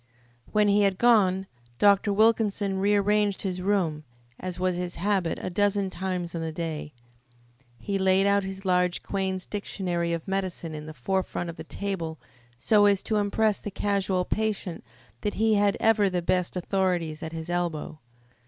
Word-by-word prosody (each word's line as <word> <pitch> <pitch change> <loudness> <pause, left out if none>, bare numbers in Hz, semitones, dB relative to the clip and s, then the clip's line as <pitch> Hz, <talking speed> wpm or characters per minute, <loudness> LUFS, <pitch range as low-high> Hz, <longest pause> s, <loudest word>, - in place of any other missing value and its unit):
When 210 -1 +3
he 205 +1 +4
had 195 -2 +2
gone 195 -5 +4 0.3
Dr. 205 - +4
Wilkinson 210 -2 +2
rearranged 205 0 +2
his 185 -2 -3
room, 180 -6 0 0.4
as 185 -1 -5
was 185 -1 +1
his 175 0 -4
habit 190 -2 0
a - - -4
dozen 200 0 +1
times 180 -2 -3
in 165 - -3
the 160 0 -3
day. 155 -2 -4 0.9
He 195 - -2
laid 190 +1 +3
out 200 0 +3
his 190 +1 -7
large 180 -1 +1
Quain's 190 -2 -2
Dictionary 180 -4 -2
of 170 +1 -3
Medicine 185 -4 -3
in 150 0 -7
the 155 - -8
forefront 175 +4 -2
of - - -14
the 160 - -8
table 165 -3 -4 0.4
so 205 - +4
as 200 -2 +2
to 215 - 0
impress 210 +1 +1
the - - -4
casual 195 -2 0
patient 210 -5 -2 0.4
that 210 - -2
he 220 +1 +3
had 205 -1 +3
ever 215 -3 +3
the 180 -2 -2
best 180 +1 0
authorities 180 -4 -1
at 160 -1 -5
his 165 0 -6
elbow. 175 -3 -2
190 Hz, 165 wpm, -26 LUFS, 175-205 Hz, 0.9 s, he